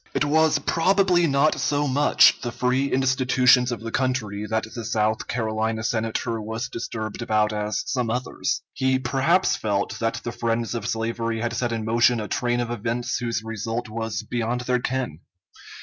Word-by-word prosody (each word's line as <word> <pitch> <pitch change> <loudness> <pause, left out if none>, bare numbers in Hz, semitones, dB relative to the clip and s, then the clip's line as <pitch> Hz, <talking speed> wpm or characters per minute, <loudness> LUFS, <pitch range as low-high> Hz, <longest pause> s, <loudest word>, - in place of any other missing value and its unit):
] - - -32
It - - +2
was 155 +1 +3
probably 180 +3 +2
not 140 +1 +2
so 145 0 +1
much 140 +2 +4
the 120 - -3
free 130 +3 0
institutions 130 -1 +3
of 120 - -4
the 115 0 -5
country 110 -6 -1
that 110 0 0
the 115 - -5
South 110 0 0
Carolina 110 -1 -1
Senator 115 0 -1
was 110 +4 -4
disturbed 110 -2 -5
about 110 -2 +1
as 105 0 -2
some 125 -4 -1
others. 125 +2 -2
He 130 -1 +1
perhaps 140 +8 +2
felt 100 -2 -2
that 115 0 -1
the 120 - -3
friends 115 0 -1
of 115 -2 -3
slavery 115 0 -2
had 120 0 -2
set 120 0 -1
in 115 -2 -3
motion 120 +1 +3
a 105 - -4
train 120 +1 0
of 120 -1 -3
events 120 +1 -2
whose 115 -2 -2
result 115 +1 -4
was 110 0 -3
beyond 120 +2 -2
their 125 0 0
ken. 125 - -3
120 Hz, 175 wpm, -24 LUFS, 110-130 Hz, -, much